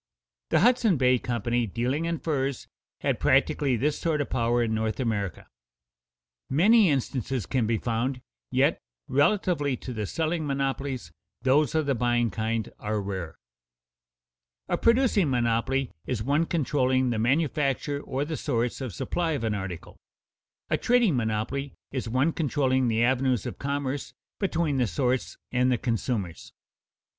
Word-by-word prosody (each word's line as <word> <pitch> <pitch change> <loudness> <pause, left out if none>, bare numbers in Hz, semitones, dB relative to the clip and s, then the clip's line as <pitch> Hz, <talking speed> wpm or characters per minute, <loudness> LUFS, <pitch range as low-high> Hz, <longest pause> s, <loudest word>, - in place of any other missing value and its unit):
The 160 - +3
Hudson 230 -5 +4
Bay 125 -1 +3
Company, 120 0 -1
dealing 125 - -1
in 170 0 -1
furs, 140 -4 -2 0.3
had - - 0
practically 135 -4 +2
this 145 +5 0
sort 160 -3 0
of 145 - -2
power 120 -1 +2
in 110 -1 -1
North 110 +1 -1
America. 105 -7 -2 1.0
Many 200 - +5
instances 130 - -1
can 125 0 0
be 115 0 +1
found, 120 +3 -1 0.3
yet, - - +2 0.3
relatively 145 -2 +2
to 125 - -7
the 105 -3 -3
selling 160 - -1
monopolies, 135 - -2 0.3
those 140 +3 +3
of 155 -1 +2
the 140 - +2
buying 120 -1 +1
kind 110 +2 -1
are 105 0 -2
rare. 95 -5 -5 1.3
A - - +1
producing 230 - +3
monopoly 125 +2 0 0.2
is 115 -4 -2
one 145 +6 +1
controlling 130 -5 +1
the 115 - -1
manufacture 140 +2 0
or 135 +1 -2
the 155 0 -4
source 120 -2 -1
of 125 -9 -5
supply 170 -2 -1
of 140 - -3
an 110 -1 0
article; 95 -4 -6 0.7
a - - +3
trading 235 - +3
monopoly 115 +4 -2 0.2
is 130 -4 -3
one 130 +7 +2
controlling 130 -5 +1
the 115 0 +2
avenues 125 -2 +2
of - - -6
commerce 140 0 -3 0.2
between 170 -7 0
the 125 -3 +2
source 125 +5 -1
and 125 +1 +2
the 125 - +2
consumers. 100 - -3
130 Hz, 145 wpm, -27 LUFS, 115-145 Hz, 1.3 s, Many